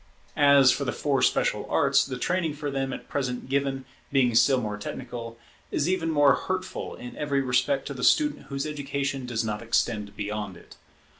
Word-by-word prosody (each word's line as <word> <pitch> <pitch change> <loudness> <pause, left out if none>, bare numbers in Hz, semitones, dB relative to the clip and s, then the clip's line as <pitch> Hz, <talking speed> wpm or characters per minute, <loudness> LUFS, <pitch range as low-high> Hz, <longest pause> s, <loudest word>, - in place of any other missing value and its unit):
As 140 -3 +6
for - - -1
the - - -1
four - - 0
special - - +1
arts, 140 0 +3
the 130 -2 -5
training 165 +2 -1
for 145 -1 -4
them 135 -1 -2
at - - -7
present 130 -3 -3
given, 135 -1 -1 0.3
being 130 -4 +3
still 120 +3 +5
more 105 -3 -3
technical, 115 +2 -7 0.3
is 145 - 0
even 180 -3 0
more 145 -3 +5
hurtful 185 +8 -4
in 125 - -9
every 140 -2 0
respect 135 - +1
to - - -4
the - - -6
student 300 -1 +3
whose 140 -1 -3
education 140 -3 -3
does 115 -2 -1
not 105 0 -3
extend 110 -3 -1
beyond 105 -2 -4
it. - - -16
135 Hz, 180 wpm, -26 LUFS, 120-145 Hz, 0.3 s, As